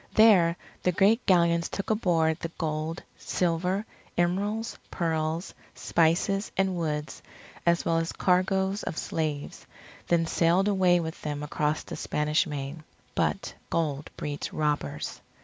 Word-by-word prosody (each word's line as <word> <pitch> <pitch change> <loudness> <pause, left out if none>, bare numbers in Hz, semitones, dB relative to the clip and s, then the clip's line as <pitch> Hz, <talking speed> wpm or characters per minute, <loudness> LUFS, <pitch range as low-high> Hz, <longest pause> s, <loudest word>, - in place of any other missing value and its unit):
There 185 -6 +6 0.2
the 180 - +2
great 205 +6 +3
Galleons 170 -2 +4
took 200 - -3
aboard 170 -7 +2
the 165 - -4
gold, 155 +1 -2 0.2
silver, 180 +4 0 0.3
emeralds, 205 +6 0
pearls, 160 +1 -1 0.2
spices, 175 +5 +1
and 190 -1 +2
woods, 155 -3 -3 0.5
as 170 0 +3
well 165 0 +2
as 165 0 -2
cargoes 190 +2 +1
of 160 - -4
slaves, 150 -3 -3 0.4
then 170 -1 +3
sailed 170 +4 +3
away 185 -3 +4
with 160 -1 -5
them 145 -1 -3
across 150 +1 -1
the - - -7
Spanish 150 +3 0
Main. 145 +1 -5 0.3
But - - -1 0.2
gold 150 -3 -1
breeds 145 -1 -4
robbers. 150 - -2
170 Hz, 130 wpm, -28 LUFS, 155-190 Hz, 0.5 s, There